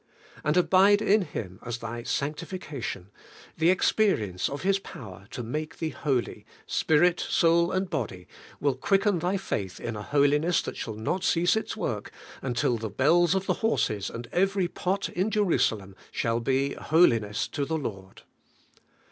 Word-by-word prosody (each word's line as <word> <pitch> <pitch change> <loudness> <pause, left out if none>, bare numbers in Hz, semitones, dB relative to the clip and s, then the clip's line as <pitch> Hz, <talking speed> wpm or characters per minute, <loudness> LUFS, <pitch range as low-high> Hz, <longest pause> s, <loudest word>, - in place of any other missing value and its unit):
' - - -21
And 150 +3 +1
abide 195 +3 +5
in 210 0 +3
Him 95 - -6
as 120 -1 -4
thy 115 +1 -6
sanctification; 145 - -4 0.4
the 160 - +2
experi 185 - +2
ence 90 0 -2
of 140 +4 -5
His 195 +1 +2
power 95 - -11
to 125 - -6
make 155 +7 -4
thee 160 - -2
holy, 130 -5 -2 0.2
spirit 170 +3 +2
and - - -4
soul 170 +1 +3
and 185 +1 0
body, 95 - -4 0.3
will 140 -2 +2
quicken 195 - +1
thy 180 +4 0
faith 100 - -4
in 115 - -4
a 105 - -5
holiness 145 +6 +2
that - - -5
shall 110 - -5
not 140 - -2
cease 175 +1 +3
its 220 0 -3
work 110 - -3 0.3
until 120 -2 0
the 110 -1 -4
bells 170 - +3
of 190 0 -1
the - - +2
horses 110 - 0
and 120 +1 -7
every 195 0 +1
pot 190 +3 -2
in 185 +5 -1
Jerusalem 115 - +1 0.2
shall 115 0 0
be 135 +3 0
Holiness 115 -10 +2
to 145 - -2
the 160 +3 -1
Lord. 100 -9 -7
150 Hz, 165 wpm, -27 LUFS, 115-180 Hz, 0.4 s, abide